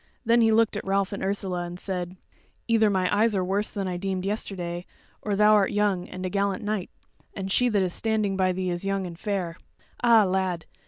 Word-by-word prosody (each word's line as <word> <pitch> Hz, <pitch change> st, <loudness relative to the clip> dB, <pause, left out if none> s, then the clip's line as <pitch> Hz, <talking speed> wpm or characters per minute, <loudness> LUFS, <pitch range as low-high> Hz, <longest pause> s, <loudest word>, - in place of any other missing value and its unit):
Then 235 Hz, +1 st, +4 dB
he 225 Hz, -1 st, +4 dB
looked 225 Hz, 0 st, +3 dB
at -, -, -3 dB
Ralph 195 Hz, 0 st, 0 dB
and 200 Hz, -, -5 dB
at 190 Hz, -, -1 dB
Ursula, 190 Hz, -3 st, -2 dB
and 175 Hz, +1 st, -7 dB
said: 180 Hz, -1 st, -4 dB, 0.5 s
"Either 225 Hz, -2 st, +4 dB
my 190 Hz, 0 st, +1 dB
eyes 215 Hz, +1 st, +3 dB
are 185 Hz, -1 st, 0 dB
worse 200 Hz, +3 st, 0 dB
than 195 Hz, -2 st, -3 dB
I 180 Hz, -1 st, -2 dB
deemed 190 Hz, 0 st, -3 dB
yesterday, 180 Hz, -4 st, -3 dB, 0.3 s
or 205 Hz, -2 st, -1 dB
thou 210 Hz, +1 st, +5 dB
art 205 Hz, -2 st, +4 dB
young, 205 Hz, -3 st, 0 dB
and 185 Hz, 0 st, -6 dB
a -, -, -1 dB
gallant 200 Hz, 0 st, 0 dB
knight, 210 Hz, -3 st, -2 dB, 0.5 s
and 195 Hz, 0 st, -4 dB
she 250 Hz, +4 st, +3 dB
that 205 Hz, -4 st, +2 dB
is 180 Hz, -2 st, -2 dB
standing 215 Hz, -3 st, 0 dB
by 185 Hz, -1 st, +2 dB
thee 185 Hz, 0 st, -2 dB
is 175 Hz, +1 st, -3 dB
young, 195 Hz, -1 st, -1 dB
and 170 Hz, -1 st, -8 dB
fair. 190 Hz, -5 st, -3 dB, 0.5 s
Ah, 230 Hz, -3 st, +6 dB
lad! 185 Hz, -3 st, -1 dB
195 Hz, 220 wpm, -26 LUFS, 185-210 Hz, 0.5 s, Ah